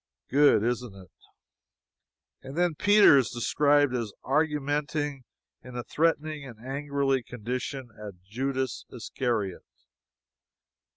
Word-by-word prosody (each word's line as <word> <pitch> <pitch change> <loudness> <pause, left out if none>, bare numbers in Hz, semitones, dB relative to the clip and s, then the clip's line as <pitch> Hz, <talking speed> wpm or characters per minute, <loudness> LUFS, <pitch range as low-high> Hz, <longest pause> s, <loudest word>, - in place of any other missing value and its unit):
Good, 140 -5 +5
isn't 120 -3 -2
it? 95 -3 -14 1.3
And 135 +3 -9
then 175 -1 +2
Peter 205 -3 +6
is 130 - 0
described 145 +3 +2
as 115 -4 -2
"argumenting 145 0 0 0.4
in 125 -1 -11
a 120 - -3
threatening 155 -1 0
and 120 -5 -11
angrily 135 +1 -1
condition 125 +2 -5
at 100 -4 -9
Judas 130 +5 -3
Iscariot." 115 -5 -3
135 Hz, 105 wpm, -27 LUFS, 120-145 Hz, 1.3 s, Peter